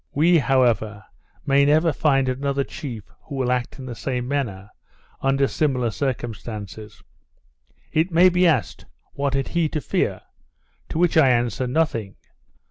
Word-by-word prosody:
We, 165 Hz, +4 st, +4 dB
however, 120 Hz, -6 st, +1 dB, 0.4 s
may 140 Hz, 0 st, +4 dB
never 155 Hz, +3 st, +3 dB
find 135 Hz, -2 st, +2 dB
another 140 Hz, +2 st, -1 dB
chief 120 Hz, -7 st, -7 dB, 0.2 s
who 145 Hz, -, -9 dB
will 130 Hz, -2 st, 0 dB
act 125 Hz, 0 st, -2 dB
in 130 Hz, -, -8 dB
the 125 Hz, -, -6 dB
same 125 Hz, +1 st, -3 dB
manner, 110 Hz, -8 st, -3 dB, 0.5 s
under 135 Hz, 0 st, +2 dB
similar 130 Hz, -7 st, 0 dB
circumstances. 110 Hz, -5 st, -5 dB, 0.9 s
It 160 Hz, +3 st, +1 dB
may 170 Hz, +3 st, +6 dB
be 180 Hz, 0 st, +3 dB
asked, 145 Hz, -9 st, 0 dB, 0.3 s
What 140 Hz, -1 st, -1 dB
had 135 Hz, -1 st, -1 dB
he 170 Hz, -2 st, 0 dB
to 155 Hz, -, -2 dB
fear? -, -, -1 dB, 0.7 s
to -, -, -4 dB
which 170 Hz, -1 st, +2 dB
I 140 Hz, -4 st, +6 dB
answer, 120 Hz, +1 st, 0 dB
Nothing. 125 Hz, -8 st, -1 dB
135 Hz, 145 wpm, -23 LUFS, 120-150 Hz, 0.9 s, may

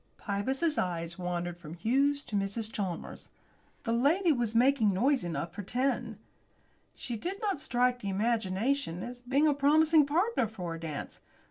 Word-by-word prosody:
Pybus's 265 Hz, +10 st, 0 dB
eyes 170 Hz, 0 st, -3 dB
wandered 175 Hz, -1 st, -3 dB
from 165 Hz, -1 st, -9 dB
Hughes 275 Hz, +9 st, +1 dB
to 215 Hz, -, -5 dB
Mrs. 200 Hz, +3 st, -2 dB
Chalmers. 185 Hz, -5 st, -5 dB, 0.5 s
The 230 Hz, -, -1 dB
lady 320 Hz, +9 st, +3 dB
was 240 Hz, -5 st, 0 dB
making 240 Hz, -3 st, +4 dB
noise 260 Hz, +6 st, +2 dB
enough 170 Hz, 0 st, -4 dB
for 205 Hz, -, -5 dB
ten. 255 Hz, +7 st, -1 dB, 0.8 s
She 240 Hz, -, -5 dB
did 365 Hz, -, -4 dB
not 405 Hz, -8 st, -1 dB
strike 250 Hz, -1 st, +1 dB
the 200 Hz, -, -4 dB
imagination 210 Hz, 0 st, 0 dB
as 245 Hz, 0 st, -7 dB
being 270 Hz, +5 st, +2 dB
a 295 Hz, -, +4 dB
promising 305 Hz, +2 st, +4 dB
partner 345 Hz, -, +1 dB
for 180 Hz, -6 st, -6 dB
a 165 Hz, -, -6 dB
dance. 155 Hz, -3 st, -6 dB
235 Hz, 155 wpm, -30 LUFS, 190-280 Hz, 0.8 s, making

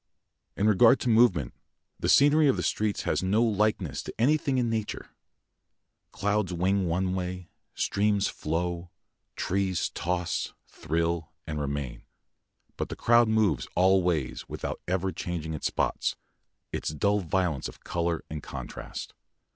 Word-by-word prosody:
In 100 Hz, -, +1 dB
regard 115 Hz, +5 st, +6 dB
to 125 Hz, -, 0 dB
movement, 110 Hz, -, +4 dB, 0.5 s
the -, -, -1 dB
scenery 145 Hz, +2 st, +6 dB
of 135 Hz, -, +3 dB
the -, -, -1 dB
streets 105 Hz, -1 st, 0 dB
has -, -, 0 dB
no 100 Hz, +5 st, +2 dB
likeness 105 Hz, -, 0 dB
to -, -, -7 dB
anything 140 Hz, +1 st, +2 dB
in 125 Hz, -2 st, +2 dB
nature. 110 Hz, -2 st, -3 dB, 1.0 s
Clouds 105 Hz, -2 st, 0 dB
wing 95 Hz, +2 st, +1 dB
one 90 Hz, +2 st, 0 dB
way, 90 Hz, -1 st, -4 dB, 0.2 s
streams 100 Hz, 0 st, +1 dB
flow, 85 Hz, +2 st, -3 dB, 0.5 s
trees 95 Hz, -2 st, 0 dB
toss, 90 Hz, -1 st, -2 dB
thrill, 85 Hz, +1 st, -2 dB
and 75 Hz, -2 st, -3 dB
remain, 70 Hz, -3 st, -3 dB, 0.8 s
but -, -, -3 dB
the -, -, -5 dB
crowd 120 Hz, 0 st, +4 dB
moves 110 Hz, -, +2 dB
all 95 Hz, +1 st, +5 dB
ways 75 Hz, -8 st, -1 dB
without -, -, -4 dB
ever 95 Hz, +1 st, 0 dB
changing 80 Hz, -4 st, -4 dB
its 75 Hz, -, -1 dB
spots, -, -, -1 dB, 0.6 s
its -, -, -2 dB
dull 100 Hz, +8 st, +1 dB
violence 90 Hz, -5 st, -1 dB
of -, -, -13 dB
colour 85 Hz, -1 st, -1 dB
and 75 Hz, 0 st, -6 dB
contrast. -, -, -7 dB
95 Hz, 140 wpm, -28 LUFS, 85-105 Hz, 1.0 s, regard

